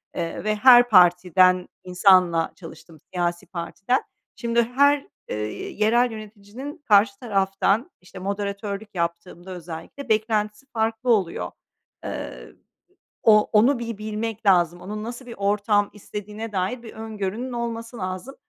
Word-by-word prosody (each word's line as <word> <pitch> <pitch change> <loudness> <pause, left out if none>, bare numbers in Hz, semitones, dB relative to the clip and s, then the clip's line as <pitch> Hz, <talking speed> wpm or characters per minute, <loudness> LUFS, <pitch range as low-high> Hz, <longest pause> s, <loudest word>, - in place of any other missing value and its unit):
Eee, 165 +3 -4
ve 215 0 0
her 245 +2 +7
partiden 180 -1 +5 0.2
insanla 180 -3 +4
çalıştım, 165 -2 -13
siyasi 175 +1 -1
partiden. 195 +8 -1 0.4
Şimdi 235 -1 +1
her, 280 +4 +2 0.2
eee, - - -3 0.3
yerel 235 +3 +2
yöneticinin 215 +7 -9
karşı 200 -1 +4
taraftan, 200 - 0
işte, 180 - -12
moderatörlük 200 +1 -4
yaptığımda 170 +2 -4
özellikle 175 - -8
beklentisi 215 +1 0
farklı 225 +2 -1
oluyor. 170 - -1 0.5
Eee, - - -7 0.7
o 210 -1 +5
onu 235 +5 +4
bir 230 -3 -5
bilmek 215 0 -4
lazım, 175 -2 +3
onun 210 +2 -6
nasıl 240 +2 -7
bir 235 - -9
ortam 205 +1 +1
istediğine 210 +2 -7
dair 200 +6 -2
bir 225 - -10
öngörünün 220 +2 -4
olması 235 0 -4
lazım. 185 +7 -5
210 Hz, 125 wpm, -24 LUFS, 185-230 Hz, 0.7 s, her